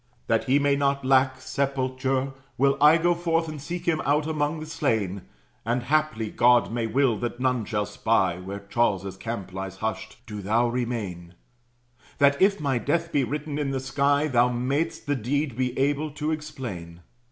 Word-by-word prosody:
"That - - +1
he 135 +2 +3
may 145 -1 +3
not 140 -1 0
lack 130 0 +3
sepulture, 130 0 -1 0.2
will 140 +1 +3
I 150 +2 +7
Go 175 +1 +3
forth, 165 -1 0
and 155 -2 -6
seek 175 +4 -5
him 160 -2 +2
out 145 +2 +2
among 155 0 -1
the 155 - -6
slain; 110 - -1 0.4
And 120 +2 -1
haply 150 -6 0
God 120 -3 +4
may 115 -1 -1
will 125 0 +2
that 120 0 -4
none 125 -3 +1
shall 105 -1 -1
spy 95 -7 +1
Where 100 +2 -6
Charles's 100 -4 0
camp 100 -2 -6
lies 95 0 -5
hushed. 110 +1 -4
Do 105 -2 -6
thou 115 +5 +2
remain; 105 -8 -4 0.8
That, 140 0 +4
if 200 +1 +4
my 135 -4 0
death 170 +6 -1
be 140 - +2
written 150 +4 -3
in 145 -2 -1
the 135 -1 -1
sky, 140 +3 +1
Thou 125 -3 +3
may'st 140 +7 -1
the 145 0 0
deed 135 +2 -1
be 125 0 -1
able 145 +3 +1
to 150 +1 -2
explain. 120 - -6
130 Hz, 175 wpm, -25 LUFS, 115-145 Hz, 0.8 s, I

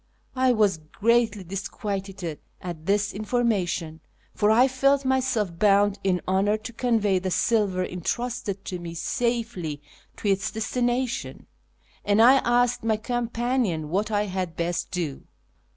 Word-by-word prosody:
I 260 0 +3
was 210 -7 +2
greatly 220 +6 +1
disquieted 195 -2 -5 0.2
at 170 -3 -7
this 200 0 +1
information, 200 -8 -1 0.3
for 210 - +2
I 240 +4 +6
felt 275 +1 +2
myself 250 -9 0
bound 205 0 +4
in 185 -2 +1
honour 195 +3 +2
to 235 +2 -9
convey 225 -5 +1
the 185 +1 -3
silver 195 -2 +1
entrusted 200 +2 -3
to 180 -2 -4
me 170 -1 -7
safely 225 - -2 0.4
to - - -4
its 195 -1 +1
destination; 245 +2 -2 0.6
and 205 +1 +2
I 250 +4 +8
asked 245 -1 +2
my 220 -1 +1
companion 235 - -1
what 200 +6 0
I 205 -1 +1
had 185 -4 -3
best 170 0 -2
do. 165 -7 -4
205 Hz, 135 wpm, -25 LUFS, 185-240 Hz, 0.6 s, I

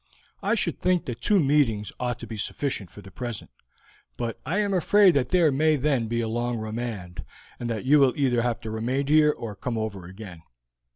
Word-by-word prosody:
I 210 +3 +1
should 175 -7 -1
think 180 -1 +1
that 120 -2 -6
two 205 -2 +3
meetings 135 - +2
ought 125 -2 -2
to - - -6
be 115 - -7
sufficient 110 -2 -3
for 105 - -13
the 95 - -12
present, 120 -4 -6 0.7
but 115 -2 -4
I 170 - 0
am 205 -1 +1
afraid 190 +2 +5
that 130 -4 +1
there 170 -5 +4
may 155 +3 +3
then 135 -5 0
be 115 +1 -1
a 115 - -2
long 120 +1 -1
remand, 110 -5 -5 0.4
and 120 - -4
that 115 +1 -3
you 145 +3 +5
will 135 -3 +4
either 125 -4 +2
have 120 -1 -1
to 110 - -6
remain 125 +5 -1
here 150 +1 +5
or 115 -7 -6
to 100 - -21
come 120 -2 -2
over 105 -5 -4
again." 95 -3 -10
120 Hz, 215 wpm, -25 LUFS, 110-150 Hz, 0.7 s, afraid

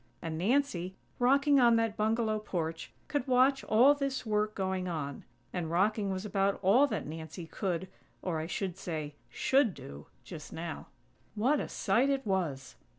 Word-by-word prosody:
And 165 -1 -4
Nancy, 190 - 0 0.2
rocking 275 +3 +4
on 235 -2 +6
that 225 -2 +1
bungalow 220 0 +1
porch, 165 -6 -4 0.2
could 290 -3 -2
watch 260 +1 +4
all 245 +6 +6
this 275 -3 -3
work 215 0 0
going 190 -1 -2
on. 150 -5 -4 0.3
And 175 -3 -2
rocking 200 +4 +1
was 190 +1 -3
about 195 -1 +1
all 235 +10 +5
that - - -3
Nancy 160 +2 -7
could, 180 +1 -3 0.4
or, 170 -4 -1
I 160 - -4
should 185 0 -3
say, 155 -5 -4 0.2
should 255 - +2
do, 70 +1 -10 0.2
just 160 -4 -9
now. 165 0 -6 0.5
What 260 +8 +2
a - - -4
sight 235 +8 +1
it 275 -2 0
was! 150 -10 -2
195 Hz, 160 wpm, -31 LUFS, 170-245 Hz, 0.5 s, on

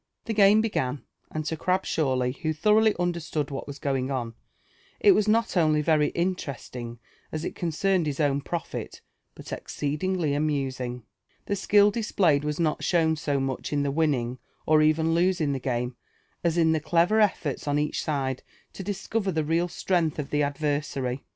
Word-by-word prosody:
The 225 - -2
game 205 +1 +6
began; 140 - -2 0.3
and 155 -1 -4
to 160 - -1
Grabshawly, 150 -8 0
who 155 -1 0
thoroughly 215 +6 +3
understood 170 -4 -2
what 135 - -5
was 140 -1 -7
going 135 -2 -1
on, 120 -4 -3 0.7
it 410 - +6
was 215 - +3
not 225 0 +2
only 155 -3 +3
very 150 -1 +3
interesting 135 -9 -3 0.3
as 155 +1 -4
it - - -3
concerned 175 +1 0
his 140 -2 -3
own 140 -2 +2
profit, 170 +3 -5 0.3
but - - -8
exceedingly 155 +2 -2
amusing. 135 -5 -2 0.4
The 200 - -1
skill 205 +1 +4
displayed 190 -9 +2
was 150 +1 -2
not 155 -3 0
shown 160 -3 +2
so 145 -2 -1
much 135 -1 -3
in 145 -1 +1
the 140 - 0
winning 135 -5 0 0.3
or 155 0 +5
even 160 +1 +3
losing 170 -4 +2
the 135 - -2
game, 125 -1 -2 0.5
as 170 -1 +1
in 165 -1 +4
the 160 - +2
clever 170 +7 +2
elTorts 170 - 0
on 145 0 +1
each 150 0 -1
side 135 -4 -2 0.3
to - - -7
discover 200 +1 -2
the 160 -2 0
real 165 +3 +1
strength 170 -3 0
of 150 -2 -4
the 150 - +1
adver 145 0 0
sary. 130 -2 -4
155 Hz, 170 wpm, -26 LUFS, 140-175 Hz, 0.7 s, game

